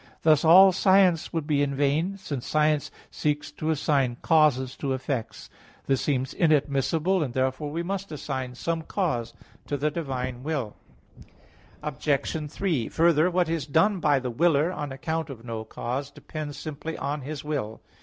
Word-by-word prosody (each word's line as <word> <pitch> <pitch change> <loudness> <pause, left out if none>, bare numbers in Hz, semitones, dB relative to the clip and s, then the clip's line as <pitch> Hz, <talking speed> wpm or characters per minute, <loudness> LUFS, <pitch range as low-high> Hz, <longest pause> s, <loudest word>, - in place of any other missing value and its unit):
Thus 155 -2 +5
all 185 +4 +8
science 190 -3 +3
would 165 -3 -2
be 145 -2 +1
in 140 -1 0
vain, 150 +8 +1
since 145 -10 -5
science 150 -1 +2 0.2
seeks 150 -1 -2
to 155 - -4
assign 140 -5 +1
causes 150 -6 +3
to 135 -2 -2
effects. 130 -2 -4 0.4
This 135 -2 +1
seems 130 -2 -1
inadmissible, 155 +3 +2
and 130 -6 -3
therefore 130 +3 -1
we 165 +3 -3
must 195 +1 -4
assign 130 -4 -4
some 165 +6 -2
cause 150 - -2 0.3
to 145 - -1
the 150 +2 0
divine 130 -6 -4
will. 135 -7 -3 1.1
Obj. 150 +1 -1
3: 160 - -1
Further, 165 0 +3
what 180 -1 +1
is 160 -3 -2
done 185 +7 +3
by 150 -3 +3
the 125 -2 -3
willer, 160 +4 +2
on 150 -6 -5
account 160 +4 -3
of 120 -4 -9
no 115 -2 -4
cause, 125 +5 -4
depends 145 0 -7
simply 155 +1 -6
on 145 +1 -3
his 145 +2 -6
will. 135 -8 -3
150 Hz, 160 wpm, -26 LUFS, 135-165 Hz, 1.1 s, all